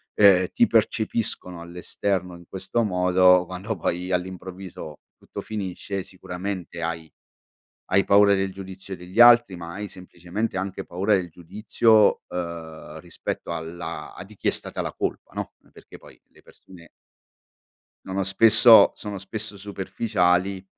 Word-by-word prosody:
ehm, 95 -3 +6
ti - - +4
percepiscono 100 -5 -1
all'esterno 90 +1 -3
in 85 - -14
questo 95 +5 -2
modo, 90 -2 +4
quando 95 +4 -5
poi 90 +2 -3
all'improvviso 90 -3 -6 0.2
tutto - - -10
finisce, 100 -2 -5
sicuramente 90 -2 -6
hai 85 -1 -4 0.8
hai 100 +1 +4
paura 100 0 +5
del 95 0 -1
giudizio 95 0 -9
degli 90 +5 -3
altri, 120 -4 +7
ma 85 -1 -8
hai 105 +1 -5
semplicemente 90 +3 -6
anche 95 +1 -4
paura 95 +5 -1
del 90 -3 0
giudizio, 105 +5 +2
ehm, 80 -3 -7
rispetto 85 -1 -6
alla 80 -1 -6
a 90 - -9
di 110 - -15
chi - - -2
è - - +6
stata - - -3
la - - -3
colpa, - - -4
no? - - -5
N - - -26
perché - - -15
poi, - - -18
le - - -22
persone 85 -3 -17 1.2
no, 95 - -6
no 95 +1 0
spesso 110 +4 +7
sono 105 -2 -7
spesso 105 +2 -7
superficiali 95 -1 -1
95 Hz, 140 wpm, -24 LUFS, 90-100 Hz, 1.2 s, altri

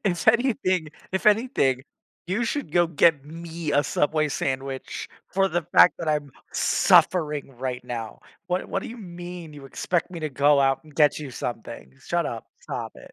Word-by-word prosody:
If 180 +1 +1
anything 220 - +2 0.2
if 190 - -1
anything, 210 - +3 0.4
"You 195 +7 0
should 285 +4 -3
go 175 -1 +4
get 160 -2 +3
me 165 0 -5
a 145 - +4
Subway 155 0 +1
sandwich 135 -1 -3 0.2
for 195 +1 +2
the 175 -1 -1
fact 170 +2 +6
that 165 - -3
I'm 150 -2 0 0.2
suffering 150 -7 +3
right 125 -1 -3
now, 115 -2 -6 0.3
what 180 +1 -1
what 195 - -2
do - - -6
you 235 - -8
mean 175 -4 -8
you 145 -2 -11
expect 175 +6 -1
me 170 -3 -7
to 155 - -2
go 140 +1 +4
out 135 +2 +2
and 150 - -17
get 150 -1 +4
you 150 -3 -6
something? 115 - -6
Shut - - -1
up, - - -5
stop - - -5
it." - - -14
160 Hz, 180 wpm, -25 LUFS, 140-180 Hz, 0.4 s, fact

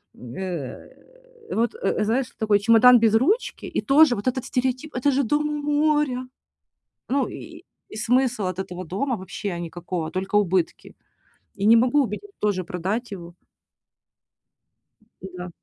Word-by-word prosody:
э, 190 - -9
вот, 235 - 0
э, 455 - -1
знаешь, 240 +4 0
такой 215 -2 +2
чемодан 230 +4 +6
без 225 -1 +3
ручки, 360 - +1
и - - +1
тоже 285 -2 +5
вот 205 - -5
этот 255 0 -1
стереотип: 260 +3 -2
"Это 255 +3 +2
же 275 +1 +1
дом 295 +5 0
у 295 0 -3
моря". 295 -4 +1 0.8
Ну 270 -1 +1
и 335 +1 -10 0.3
и - - -9
смысл 245 -1 +1
от 185 0 -3
этого 185 -1 -6
дома 230 - -2
вообще 185 -1 -5
никакого, 170 -1 -5
только 190 +4 -3
убытки. 185 -4 0 0.6
Я 200 0 0
не 225 - +8
могу 255 +5 +3
убедить 255 - -6
тоже 205 -3 0
продать 190 +8 -3
его. 175 -3 -9 1.9
Да. 180 -1 -8
230 Hz, 140 wpm, -23 LUFS, 185-275 Hz, 1.9 s, не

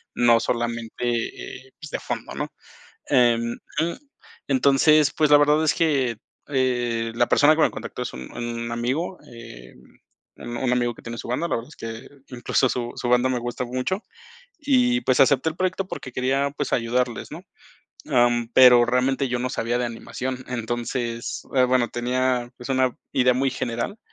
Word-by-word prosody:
no 120 -1 +5
solamente, 120 0 -3
eh, - - -24
pues, 150 - -8
de - - -3
fondo. - - -5
¿no? - - -3 0.6
Em, 120 -3 +3 0.3
mm, 170 +2 0 0.6
entonces, 150 - +4
pues, 155 -2 +3
la 145 - +8
verdad 150 +2 +4
es 150 - +3
que, 135 -8 +1 0.3
eh, 120 -4 0
la 120 - +3
persona 155 +2 +5
que 160 - +2
me - - +4
contactó - - -6
es - - -5
un 65 0 -9
un 115 0 -4
amigo, 130 +10 -2
em, 65 - -12 0.5
un 120 0 -7
un 125 -2 0
amigo 120 -1 +1
que - - -15
tiene 115 0 -7
su - - -7
banda, 130 +8 -1
la - - 0
verdad 115 +1 -6
es - - -15
que 115 +3 -7 0.2
incluso 125 +1 0
su 120 -1 -3
su 120 - -4
banda 125 +1 +3
me 125 -1 0
gusta 120 +1 -4
mucho, 130 +10 -2 0.6
y, 255 -4 +2
pues, 130 - +2
acepté 135 +3 +4
el 155 - -10
proyecto 185 +1 -1
porque 130 - -7
quería, 135 +3 0
pues, 145 - -3
ayudarles, 120 0 -1
¿no? - - -8 0.7
Ah, 120 -2 +5
mm, 120 -1 -2
pero 125 -2 +8
realmente 130 +2 +1
yo 125 0 -1
no 125 0 -2
sabía 120 +2 -1
de 125 - 0
animación, 125 +2 -5
entonces, 120 0 -3
eh, 130 - +5
bueno, 125 -1 +2
tenía, 125 0 -1
pues, 125 - -9
una 130 -1 +1 0.2
idea 125 -1 +3
muy 135 +1 +1
general, 120 - -3
125 Hz, 180 wpm, -23 LUFS, 120-135 Hz, 0.7 s, la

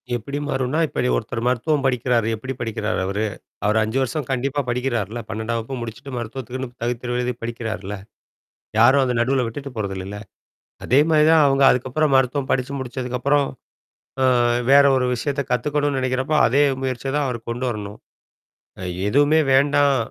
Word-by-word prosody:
எப்படி 140 +5 -5
மாறும்னா, 135 +4 -1
இப்போ - - -6 0.2
ஒருத்தர் 115 - -3
மருத்துவம் 140 +4 +1
படிக்கிறாரு 125 -3 +1
எப்டி 130 +5 -5
படிக்கிறாரு 110 -2 -2
அவரு? 100 +3 -1 0.4
அவர் 105 +1 +2
5 110 +4 -2
வருஷம் 130 +2 -2
கண்டிப்பா 135 +3 -1
படிக்கிறார்ல, 120 -3 -2
12ஆம் 110 +3 -2
வகுப்பு 125 +3 -6
முடிச்சிட்டு 115 +4 -7
மருத்துவத்துக்குன்னு 125 +2 -5
தகுதித் 120 0 -2
தேர்வு 125 0 -2
எழுதி 125 0 -1
படிக்கிறாருல. 110 -4 -4 0.8
யாரும் 130 +4 +6
அந்த 125 - -1
நடுவுல 130 +1 +1
விட்டுட்டு 140 +4 -6
போறதில்லல்ல. 95 -1 -4 0.7
அதே 130 +3 +3
மாரி 155 -1 +4
தான் 160 -2 +6
அவங்க 135 0 +3
அதுக்கப்புறம் 135 +4 0
மருத்துவம் 130 +1 +1
படிச்சு 130 +1 0
முடிச்சதுக்கப்புறம் 130 +2 0 0.8
அ - - +3 0.5
வேற 140 0 +7
ஒரு 125 -1 +1
விஷயத்த 140 +4 -2
கத்துக்கனும்ணும்னு 145 +2 0
நெனைக்கிறப்போ, 130 +4 0
அதே 140 +5 +3 0.2
முயற்சிய 130 0 -2
தான் 145 -2 +1
அவர் 120 -2 -5
கொண்டு 120 +2 -3
வரணும். 105 -1 -6 1.1
எதுவுமே 145 +6 +4
வேண்டாம். 140 0 +4
125 Hz, 145 wpm, -22 LUFS, 115-140 Hz, 1.1 s, வேற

